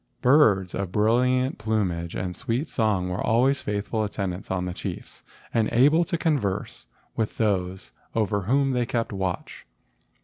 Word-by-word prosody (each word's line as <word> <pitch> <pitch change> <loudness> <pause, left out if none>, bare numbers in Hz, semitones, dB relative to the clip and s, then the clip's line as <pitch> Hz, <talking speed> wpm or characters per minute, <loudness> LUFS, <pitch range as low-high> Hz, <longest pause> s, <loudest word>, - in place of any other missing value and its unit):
Birds 110 - +4
of 95 -2 -3
brilliant 125 +5 +2
plumage 90 -6 -1
and 90 -1 -3
sweet 125 +7 -2
song 105 -8 0
were 90 0 -3
always 130 +4 +2
faithful 105 +2 -2
attendants 100 -3 -4
on 90 -1 -1
the 90 - -3
chiefs, - - -7 0.3
and 110 -2 +2
able 145 +8 +5
to 170 - -2
converse 140 - -1 0.3
with 110 -2 -2
those 95 - -1 0.2
over 105 -2 +1
whom 135 +7 +2
they 125 -2 0
kept 115 -1 -2
watch. 95 -2 -4
110 Hz, 145 wpm, -25 LUFS, 95-125 Hz, 0.3 s, able